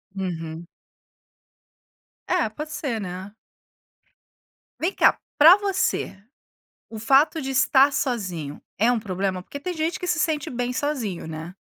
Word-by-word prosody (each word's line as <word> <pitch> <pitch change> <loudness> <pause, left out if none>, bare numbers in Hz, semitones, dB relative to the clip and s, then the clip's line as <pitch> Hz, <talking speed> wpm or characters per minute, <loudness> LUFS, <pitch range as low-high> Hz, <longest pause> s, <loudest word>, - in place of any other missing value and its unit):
Uhum. 165 -3 -5 1.6
É, 355 -10 +1
pode 300 +8 -7
ser, 255 -8 -3
né. 185 +1 -7 1.5
Vem 350 +5 0
cá, - - +4 0.2
pra 325 +6 +9
você, 395 - -1 0.8
o 225 - -7
fato 275 +8 +3
de 270 -2 -4
estar 270 +1 +4
sozinho 185 - -3 0.2
é 225 +5 +3
um 245 - +2
problema? 190 -2 -2
Porque 285 +9 -9
tem 360 +5 -3
gente 325 +1 -2
que 360 - -3
se 350 -2 +1
sente 310 -4 -1
bem 245 0 -2
sozinho, 250 - -3
né? 160 +3 -7
245 Hz, 135 wpm, -24 LUFS, 185-305 Hz, 1.6 s, pra